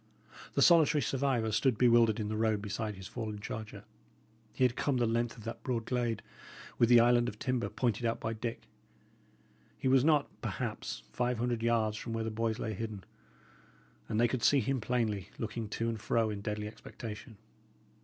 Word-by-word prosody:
The - - +4
solitary 160 -3 +5
survivor 130 -5 0
stood 120 +2 +2
bewildered 115 -2 +5
in 105 - -2
the 110 - -2
road 110 -1 +1
beside 105 +1 -4
his 95 0 -10
fallen 105 0 -5
charger. 110 +1 -7 0.7
He - - -1
had 125 -1 +3
come 140 -3 0
the 120 - +2
length 115 +1 0
of 110 - -11
that 115 +1 -6
broad 120 -3 -2
glade, 120 -3 -1 0.6
with 120 - +5
the 120 -1 +8
island 120 0 +4
of 105 - -10
timber, 125 +1 -1
pointed 120 -3 -1
out 115 0 0
by 115 - -2
Dick. 115 +1 -5 1.1
He - - -2
was 130 -1 +5
not, 150 -2 +4
perhaps, - - -4
five 125 0 0
hundred 120 0 -1
yards 115 -2 +1
from 115 +1 -5
where 115 0 -1
the 110 - -3
boys 110 0 -1
lay 110 - -3
hidden; 105 -1 -5 1.1
and 110 - 0
they 120 - +5
could 130 0 -2
see 140 - +5
him 130 +1 -1
plainly, 110 -5 -1
looking 110 -1 -4
to 115 +2 -2
and 115 -2 -3
fro 115 -1 +1
in 100 -1 -5
deadly 105 0 -3
expectation. 110 +1 -9
115 Hz, 185 wpm, -32 LUFS, 110-120 Hz, 1.1 s, the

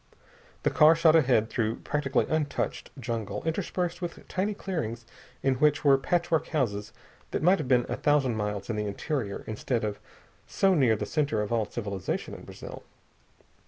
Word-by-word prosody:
The - - +2
car 155 +2 +6
shot 165 -1 +5
ahead 125 -8 +4
through 115 -2 -1
practically 140 -2 0
untouched 155 -2 -2
jungle, 110 -4 -4
interspersed 175 +1 -2
with 175 -2 -6
tiny 200 +3 -1
clearings 120 - -4 0.4
in 135 - +3
which 150 0 +3
were 140 -1 +7
patchwork 170 +1 +1
houses 105 -10 -1 0.4
that - - -2
might 180 +3 +5
have 150 - -3
been 125 -2 +3
a - - -3
thousand 140 -5 +2
miles 105 -2 -3
in 110 - -2
the 105 0 -1
interior 105 0 -3
instead 110 +2 -2
of 105 -1 -3 0.5
so 195 -1 +3
near 130 -9 +4
the - - -3
center 140 -9 0
of 105 - -5
all 115 -2 +2
civilization 100 -4 -4
in - - -9
Brazil. - - -9
135 Hz, 165 wpm, -28 LUFS, 110-160 Hz, 0.5 s, were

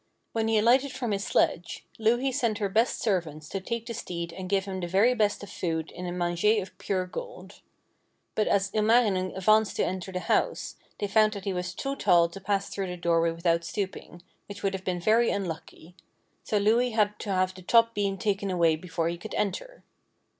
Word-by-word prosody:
When 225 -1 0
he 225 0 +3
alighted 255 +5 +4
from 250 -4 -3
his 200 0 -1
sledge, 175 -3 0
Louhi 240 +4 +2
sent 230 -4 0
her 205 -2 -1
best 225 +5 +1
servants 160 -7 -1
to 195 - -3
take 230 +3 -4
the 235 - -5
steed 170 -5 -5
and 185 +1 -7
give 195 -1 +1
him 190 -1 -4
the 175 - -3
very 200 +8 +4
best 210 -4 0
of 205 - -9
food 160 -2 -3
in 180 - -6
a - - -3
manger 175 +5 +1
of 190 -1 -7
pure 185 -2 -1
gold. - - -9 0.7
But 215 - +1
as 200 0 +1
Ilmarinen 215 -4 +2
advanced 215 +3 +3
to - - +1
enter 185 +1 -4
the 180 -1 -3
house, - - 0 0.2
they - - -1
found 215 +1 +3
that 200 -2 -7
he 195 - -1
was 180 0 -4
too 275 +5 -3
tall 175 -8 +4
to 195 +3 -10
pass 200 0 0
through 195 -1 -3
the 180 0 -5
doorway 170 -1 +2
without 170 0 0
stooping, 185 -2 -5 0.2
which 200 -1 -9
would 195 -1 +1
have 190 -1 -5
been 180 -2 -2
very 225 +6 +3
unlucky: 175 -2 -5 0.5
so 210 - 0
Louhi 230 +4 +2
had 210 -1 +1
to 210 - -6
have 185 -1 +1
the 185 - -12
top 230 +4 +4
beam 200 -2 -1
taken 200 -2 -1
away 170 -3 +3
before 165 0 -3
he 170 0 -3
could 220 - -7
enter. 210 - -3
195 Hz, 210 wpm, -27 LUFS, 180-220 Hz, 0.7 s, alighted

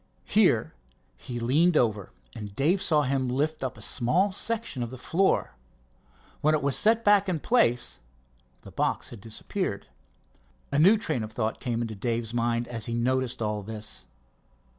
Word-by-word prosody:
Here - - +3 0.4
he 120 -1 -6
leaned 150 +8 +3
over, 105 -5 +1 0.3
and 105 -2 -8
Dave 170 - +2
saw 155 -6 +3
him 135 -1 0
lift 150 +4 -1
up 130 -4 -4
a 105 - -4
small 170 - +1
section 225 - -1
of 120 - -3
the 130 - -9
floor. 185 +9 +1 0.9
When 155 +1 +3
it 150 - -2
was 140 -1 +2
set 225 +1 +3
back 205 -1 +5
in 170 -4 -1
place 150 - +2 0.6
the - - -11
box - - -1
had 115 - -11
disappeared. 110 0 -4 0.9
A 140 - +1
new 195 +8 +6
train 155 - -2
of 110 0 -6
thought 110 0 -2
came 120 -2 -2
into 110 -1 -5
Dave's 115 +2 -3
mind 120 0 0
as 115 -3 -5
he 115 - -2
noticed 130 0 0
all 105 -1 -2
this. 110 +1 -6
125 Hz, 165 wpm, -27 LUFS, 115-160 Hz, 0.9 s, new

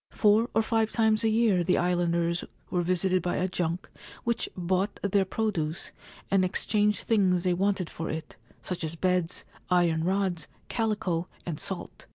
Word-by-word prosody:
Four 215 +3 +3
or 225 - +4
five 220 0 +1
times 220 -1 +2
a 225 - +3
year 215 -5 +3
the 180 +2 +2
islanders 170 -1 +1 0.3
were 180 - +1
visited 185 +1 +1
by 175 - -1
a 185 - +1
junk 175 -1 -2 0.4
which 235 -1 0
bought 185 +3 0
their 200 -1 +2
produce, 185 -6 -2 0.4
and 195 -1 +4
exchanged 210 +2 +1
things 185 -5 +2
they 180 -1 +2
wanted 190 -1 0
for 165 - -5
it 160 -1 -5
— - - -28
such 180 -2 -4
as 160 +1 -2
beds, 180 0 0 0.2
iron 170 -3 +3
rods, 185 -3 0 0.2
calico, 205 -7 -1 0.2
and 165 -4 -4
salt. - - -6
185 Hz, 165 wpm, -28 LUFS, 175-205 Hz, 0.4 s, or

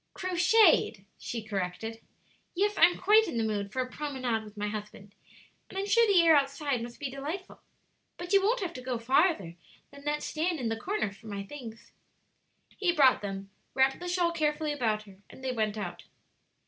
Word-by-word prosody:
"Crocheted," 365 - +3
she 230 -2 -5
corrected; 210 +2 -4 0.5
"yes, 410 +3 +2
I'm 355 - +5
quite 435 +2 +5
in - - -3
the 225 - +1
mood 205 -2 -2
for 260 +2 -1
a - - -8
promenade 255 -7 -2
with 210 0 -13
my 205 0 -2
husband; 210 -1 -7 0.6
and - - -9
I'm 390 - -1
sure 465 +3 +4
the 395 -3 +5
air 325 -2 +7
outside 280 -2 0
must 240 0 -8
be 275 -2 -4
delightful. 300 +8 -6 0.6
But 350 +2 -5
you 395 - +6
won't 450 +5 +1
have 350 -3 -3
to 255 - -7
go 250 -1 -3
farther 230 - +1 0.3
than 280 0 -13
that 295 0 -1
stand 330 +1 -1
in 240 -3 -1
the 225 - -1
corner 365 - -2
for 200 +3 -15
my 200 -1 -4
things." 230 -1 -10 0.9
He 370 -4 +2
brought 280 -6 +5
them, 195 -1 -6 0.2
wrapped 265 0 +3
the 355 - -6
shawl 350 -1 +1
carefully 305 -2 0
about 220 -6 -1
her, 195 -2 -16
and 265 - -14
they 260 - -1
went 220 -3 -1
out. 210 - -6
265 Hz, 190 wpm, -29 LUFS, 220-345 Hz, 0.9 s, air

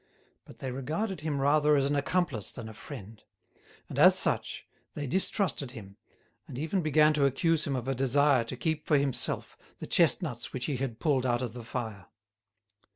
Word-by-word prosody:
But - - -14
they 130 - -5
regarded 155 - -3
him 150 -2 -2
rather 150 +2 +4
as 140 -1 +2
an 145 +1 0
accomplice 140 - 0
than 115 -3 -8
a 110 - -9
friend; 110 -3 -10 0.7
and, - - -5
as - - +7
such, - - -1 0.3
they 145 - -3
distrusted 180 - 0
him, 100 -5 -10 0.5
and - - -8
even 160 +6 -1
began 155 0 +4
to 145 -2 +3
accuse 155 +3 +1
him 140 - -1
of 125 -1 -4
a 135 - +1
desire 135 0 +3
to 125 +2 -6
keep 155 +4 -2
for 150 - +4
himself 140 -2 -1 0.2
the - - -7
chestnuts 160 -7 +1
which 125 -2 -3
he 140 - -2
had 125 -3 -4
pulled 140 -5 +1
out 120 -1 0
of 120 -3 -4
the 120 -1 -8
fire. 110 -5 -5
140 Hz, 185 wpm, -29 LUFS, 125-155 Hz, 0.7 s, as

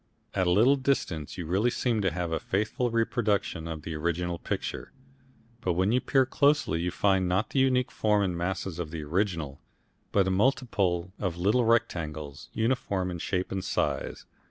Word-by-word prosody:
At 95 - +1
a - - +3
little 120 +9 +5
distance 130 - -1
you 85 - -4
really 95 +9 +2
seem 120 -2 0
to 95 - +2
have 85 0 -3
a 80 - 0
faithful 110 +6 -1
reproduction 110 -7 0
of 80 -2 -6
the 80 - -5
original 85 +2 -2
picture, - - -4 0.7
but 90 - 0
when 95 +4 +2
you 125 +2 +3
peer 135 -1 +3
closely 140 - +2
you 90 - 0
find 95 0 +2
not 95 +4 0
the 135 - +1
unique 130 -1 +2
form 105 -1 +2
and 90 -3 -1
masses 90 0 -3
of 85 -3 -3
the 80 -1 -5
original, 80 -4 -2 0.5
but 100 -2 +3
a - - +1
multitude 95 -5 +1
of 90 -4 -2
little 105 +7 +2
rectangles, 80 -10 -1
uniform 110 -5 0
in 85 - -5
shape 90 +2 -2
and 95 -1 -2
size. - - -2
95 Hz, 180 wpm, -28 LUFS, 85-115 Hz, 0.7 s, little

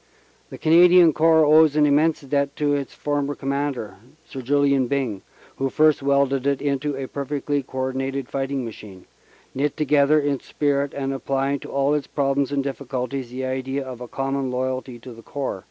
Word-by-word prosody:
The - - -9
Canadian 175 0 +6
Corps 160 0 +4
owes 155 0 +5
an 150 -1 +4
immense 150 +3 +2
debt 140 0 -1
to 145 -1 0
its 140 -2 -2
former 145 -1 -2
Commander, 140 -5 -3 0.3
Sir 135 - -8
Julian 140 0 +2
Byng, 125 -8 -2 0.4
who 135 0 -1
first 155 +1 +3
welded 140 -1 +1
it 140 -1 +1
into 145 0 -1
a 135 -1 -4
per 140 - -5
fectly 145 0 -2
co 130 - -11
ordinated 135 0 -2
fighting 135 -1 -3
machine, 105 -4 -10 0.5
knit 140 +2 -1
together 150 0 +3
in 145 -2 -1
spirit 140 -1 -1
and 135 -1 -2
applying 135 +1 -1
to - - -10
all 140 +1 +1
its 150 -1 -1
problems 140 -1 0
and 140 -1 0
difficulties 135 -1 -4
the 130 +2 -5
idea 130 +1 -3
of 125 -2 -8
a 125 - -6
common 135 0 -2
loyalty 130 0 -3
to 120 +1 -11
the 115 - -13
Corps. 135 -4 -4
140 Hz, 180 wpm, -23 LUFS, 130-145 Hz, 0.5 s, Canadian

